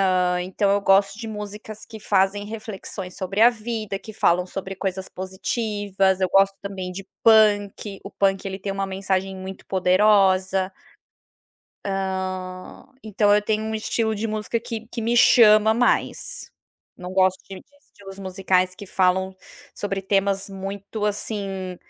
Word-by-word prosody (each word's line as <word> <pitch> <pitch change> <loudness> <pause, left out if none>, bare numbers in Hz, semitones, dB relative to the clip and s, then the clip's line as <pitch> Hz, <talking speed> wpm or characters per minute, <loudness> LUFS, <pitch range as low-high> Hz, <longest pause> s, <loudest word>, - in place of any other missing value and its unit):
Hã, 180 0 +1
então 190 +2 0
eu 200 0 +2
gosto 195 0 +3
de 225 0 -6
músicas 210 +1 -7
que 220 -1 -10
fazem 200 0 +1
reflexões 205 -3 -7
sobre 195 +2 -4
a 235 - +9
vida, 220 -3 -4
que 220 - -10
falam 180 -4 +2
sobre 195 +1 -6
coisas 190 0 -3
positivas, 195 0 -1
eu 185 - +2
gosto 195 +1 +4
também 190 -2 -5
de 190 +1 -8 0.2
punk, 205 -2 +3
o 195 - -9
punk 195 -1 +1
ele 190 0 -4
tem 200 0 -4
uma 195 0 -2
mensagem 190 0 -2
muito 190 0 -8
poderosa. 190 0 +3 1.1
Hã, 190 -1 -4 0.2
então 205 -1 +2
eu 210 - +3
tenho 215 +1 -1
um 220 0 -3
estilo 220 0 -1
de 220 +2 -3
música, 215 +2 -2
que 230 -1 -6
que 230 0 -6
me 235 +2 +1
chama 220 -2 +6
mais, 370 - 0 0.5
não 180 0 -8
gosto 185 0 +2
de 190 - -7 0.3
estilos 195 -1 -12
musicais 185 -1 +1
que 200 +1 -10
falam 190 0 +1 0.4
sobre 195 -1 -3
temas 195 0 0
muito 195 +2 -5
assim, 195 -3 -3
195 Hz, 150 wpm, -23 LUFS, 190-215 Hz, 1.1 s, a